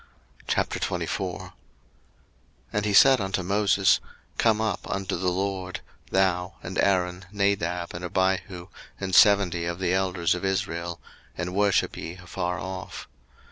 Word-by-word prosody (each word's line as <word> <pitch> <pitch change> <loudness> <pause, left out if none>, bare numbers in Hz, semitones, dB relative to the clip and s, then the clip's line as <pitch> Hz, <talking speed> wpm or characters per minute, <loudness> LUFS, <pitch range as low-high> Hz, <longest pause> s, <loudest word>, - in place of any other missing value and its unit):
02:024:001 - - -2 1.2
And 105 0 0
he 105 - +1
said 135 +1 +7
unto 95 -1 -2
Moses, 100 0 +3 0.4
Come 110 -2 +3
up 110 -4 -2
unto 95 -1 -2
the 90 +1 0
LORD, 95 0 -3 0.3
thou, 90 -2 +1
and - - -4
Aaron, 90 -1 +1
Nadab, 90 -4 0
and 85 - -6
Abihu, 95 0 -1 0.3
and 95 -1 -4
seventy 95 -4 +5
of 85 0 -3
the 90 -1 0
elders 95 -2 +1
of 90 - -5
Israel; 85 -3 -2 0.4
and 90 +1 -3
worship 100 0 +2
ye 85 - -6
afar 90 0 -4
off. 95 -1 -6
95 Hz, 130 wpm, -26 LUFS, 90-100 Hz, 1.2 s, said